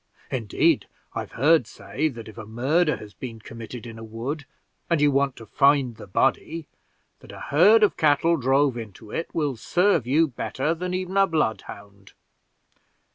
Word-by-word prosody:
Indeed, 115 -6 +1 0.3
I've - - -5
heard 145 0 +3
say, 155 +5 -3
that 115 -6 -7
if 110 - -11
a 110 -2 -9
murder 150 +9 +1
has 105 -1 -11
been 115 -3 -8
committed 115 +2 -9
in 115 -1 -9
a - - -9
wood, 125 +7 -5 0.4
and 170 -3 +2
you 145 0 +4
want 140 -1 +1
to 115 - -11
find 140 0 +3
the 105 - -11
body, 150 - 0 0.5
that - - -14
a - - -10
herd 205 +10 +5
of 210 - +3
cattle 155 +2 +3
drove 135 -1 +2
into 110 -1 -9
it 165 - -3
will 145 -5 -1
serve 175 - +1
you 155 +5 +3
better 135 +3 -2
than 180 +2 -3
even 185 +1 -3
a 195 0 +5
bloodhound." 100 - -4
135 Hz, 170 wpm, -24 LUFS, 115-160 Hz, 0.5 s, herd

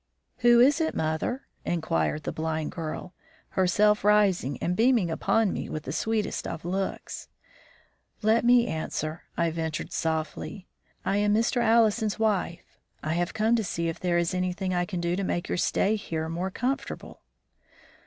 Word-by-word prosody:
"Who 240 -1 +5
is 280 +6 +5
it, 320 - 0
mother?" 160 - -1 0.2
inquired 155 - -1
the - - -2
blind 160 -1 -2
girl, 165 +2 -5 0.4
herself 210 +3 +3
rising 200 -10 +3
and 180 - -1
beaming 225 -6 +3
upon 215 +5 +1
me - - -4
with 155 - -4
the 135 - -5
sweetest 220 +6 -1
of 165 0 -6
looks. 190 +2 -3 1.0
"Let 220 +2 +4
me 240 0 +5
answer," 155 -3 -4
I 170 -1 +2
ventured, 160 -1 -3
softly. 160 +4 -3 0.4
"I 195 - +1
am 205 0 +3
Mr. 230 +3 +1
Allison's 220 -2 +3
wife. 200 -6 -1 0.2
I 155 - -1
have 175 +3 -1
come 220 +2 +3
to 225 - 0
see 170 -3 -2
if 165 - -5
there 175 -1 +1
is 170 0 +1
anything 185 +1 -1
I 175 0 +1
can 180 -2 -4
do 170 +1 0
to 195 - -2
make 175 -2 -2
your - - -1
stay 205 +4 +2
here 160 -5 -3
more 175 +3 -2
comfortable." 255 +8 -4
185 Hz, 165 wpm, -27 LUFS, 165-220 Hz, 1.0 s, Who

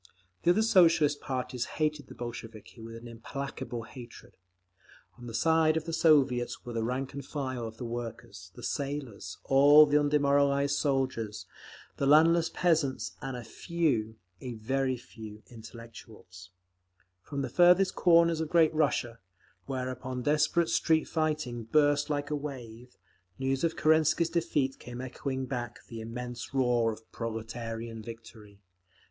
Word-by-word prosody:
The - - +2
other 205 +5 +4
Socialist 165 -9 +4
parties 125 -2 -3
hated 150 -3 -1
the - - -12
Bolsheviki 115 -1 -8
with 115 0 -9
an 115 +1 -10
implacable 120 0 -6
hatred. 120 +1 -12 0.8
On 120 - -9
the 115 - -7
side 160 +4 +3
of 160 - -3
the 165 - -5
Soviets 145 -7 +2
were 120 - -6
the 115 -1 -1
rank 130 +4 -3
and 140 0 -6
file 130 -4 -4
of 110 0 -10
the 120 - -6
workers, 115 -6 -7
the 120 - -11
sailors, 135 -10 -4
all 145 +3 +7
the 145 0 +3
undemoralised 140 -1 +2
soldiers, 130 -8 -1 0.5
the 140 - 0
landless 165 +3 +5
peasants, 160 -7 0
and 135 -3 -4
a 120 - -7
few—a 115 - -3
very 130 +3 -1
few—intellectuals…. 110 -4 -12 0.7
From 140 -2 -4
the - - -3
farthest 180 +2 +5
corners 170 -2 +4
of 160 - -3
great 165 -2 +4
Russia, 130 -7 0 0.5
whereupon 130 -1 -4
desperate 150 +3 +2
street 160 -1 +2
fighting 155 -7 -2
burst 145 +3 +2
like 145 -1 -2
a - - +1
wave, 125 -4 -8 0.4
news 135 +1 -1
of 165 -1 +1
Kerensky's 160 +1 +3
defeat 155 -6 0
came 120 0 -9
echoing 130 +1 -4
back 120 -2 -5
the 115 -1 -7
immense 120 +3 -7
roar 120 -3 +2
of 110 +1 -12
proletarian 115 0 -5
victory. 110 -2 -12
130 Hz, 140 wpm, -29 LUFS, 115-150 Hz, 0.8 s, all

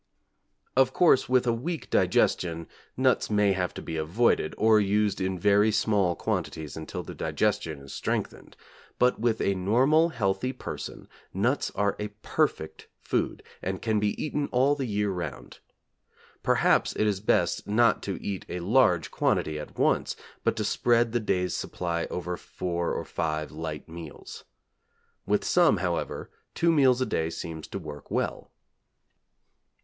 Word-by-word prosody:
Of 130 0 +4
course 160 -9 +4
with 125 0 +3
a 120 - +2
weak 155 +8 -4
digestion 85 -2 +2 0.3
nuts - - +2
may 105 -1 +3
have 90 -2 -1
to - - -7
be 80 - -4
avoided, 85 +10 +1
or 110 -1 +5
used 105 0 +1
in 95 0 -1
very 105 +4 +4
small 100 -4 +2
quantities 80 -1 -3
until 80 -1 -6
the - - -8
digestion 80 -4 -1
is 70 - -10
strengthened; - - -4 0.4
but 125 0 +3
with 115 -1 +1
a 100 - +2
normal, 130 - +3
healthy 110 -1 -1
person, 125 - -7 0.3
nuts 120 +9 +1
are 100 0 +1
a 105 - -2 0.2
perfect 80 - -1
food - - -2 0.2
and 95 0 -4
can 110 -2 +1
be 105 0 -1
eaten 150 -1 -2
all 130 +3 +3
the 135 -3 -3
year 105 -1 0
round. 90 -2 -6 0.8
Perhaps - - +2
it 110 - +1
is 100 -3 +1
best 90 -4 +1
not 115 +3 +3
to 100 -2 -4
eat 100 -2 -3
a 90 - -3
large 90 - +3
quantity 75 -1 0
at 75 - -9
once, - - +1 0.3
but - - +1
to - - -2
spread 120 -1 +2
the 120 - +1
day's 90 -4 0
supply 85 -2 -3
over 90 0 -4
four 85 -1 -3
or - - -3
five 80 -2 -2
light 80 -1 -6
meals. 80 -2 -10 0.8
With - - +1
some, - - +4
however, - - -3 0.2
two 170 0 +3
meals 130 -5 +4
a - - +2
day 80 -7 -1
seems 80 -1 -6
to - - -5
work 75 -1 -9
well. - - -2
100 Hz, 155 wpm, -27 LUFS, 85-120 Hz, 0.8 s, or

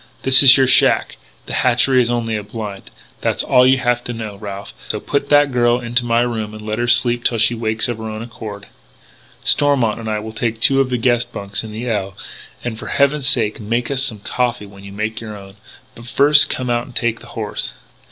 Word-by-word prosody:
"This 135 0 +7
is 135 0 +8
your 135 - +4
shack. 130 - +3 0.3
The - - -6
hatchery 125 +1 +3
is 120 - 0
only 115 -2 -1
a 105 - -3
blind. 105 -1 -8 0.3
That's - - 0
all 125 0 +4
you 130 +1 +4
have 120 -2 0
to 120 - -4
know, 110 -3 -6
Ralph. 100 -1 -8
So - - -3
put 140 0 -3
that 145 -1 +4
girl 120 -1 +2
into 120 0 0
my 115 0 +2
room 110 -3 -3
and 110 - -10
let 110 +1 -3
her 120 - -1
sleep 120 0 +3
till 115 - +1
she 115 +2 +3
wakes 110 -1 -1
of 120 -2 -4
her 110 0 -6
own 110 +1 -6
accord. 105 -3 -9 0.8
"Stormont 130 -7 +2
and 110 -1 -6
I 110 - -1
will 110 +1 -7
take 115 0 -3
two 135 +4 +4
of 130 - -1
the 125 - -1
guest 120 0 0
bunks 100 -1 -4
in 110 - -8
the 115 +3 -6
L. 100 -4 -3 0.5
And 110 -3 -5
for - - -8
heaven's 140 0 +1
sake 110 -5 0
make 115 +4 -2
us 135 -1 0
some 115 -7 -2
coffee 120 -1 -2
when 100 -1 -15
you 100 - -10
make 105 +3 -4
your 110 -2 -8
own. 100 0 -14 0.4
But 120 +1 -13
first 145 +3 +4
come 125 -1 -2
out 120 0 -1
and - - -15
take 115 -1 -1
the - - -15
horse." - - -3
115 Hz, 230 wpm, -18 LUFS, 110-125 Hz, 0.8 s, is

